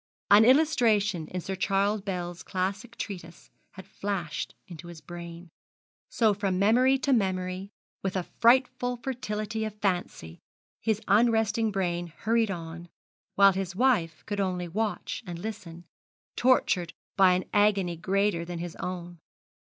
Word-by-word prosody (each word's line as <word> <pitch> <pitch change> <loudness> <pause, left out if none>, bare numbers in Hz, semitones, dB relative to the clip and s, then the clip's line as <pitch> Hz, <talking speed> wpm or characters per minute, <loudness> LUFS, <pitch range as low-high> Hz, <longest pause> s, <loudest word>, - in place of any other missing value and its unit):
An 210 +2 +8
illustration 225 - +3
in 180 +2 -4
Sir 190 - -4
Charles 200 +2 +1
Bell's 180 -3 -4
classic 195 +5 -3
treatise 175 -4 -8 0.2
had 190 - -11
flashed 190 -5 -4
into 175 -1 -10
his 170 -2 -10
brain. 170 +2 -9 0.6
So, 220 -3 +3
from 195 -2 -1
memory 245 +7 +4
to 275 0 +1
memory, 185 -3 -1 0.3
with 190 -1 -3
a 185 - 0
frightful 250 +3 +2
fertility 220 -3 -3
of 215 -1 -4
fancy, 175 - -2 0.4
his 220 -1 0
unresting 225 +1 +3
brain 175 -3 -1
hurried 225 +6 0
on; 170 -1 -6 0.5
while 200 0 +6
his 190 -1 -4
wife 205 -9 +1
could 205 -1 -3
only 180 -2 -1
watch 210 +5 -3
and 175 -1 -5
listen, 175 -4 -7 0.5
tortured 190 -9 +2 0.2
by 190 -2 +6
an 180 +1 -1
agony 200 -4 +3
greater 195 +1 0
than 175 0 -6
his 170 0 -6
own. 175 -1 -6
195 Hz, 135 wpm, -28 LUFS, 175-220 Hz, 0.6 s, An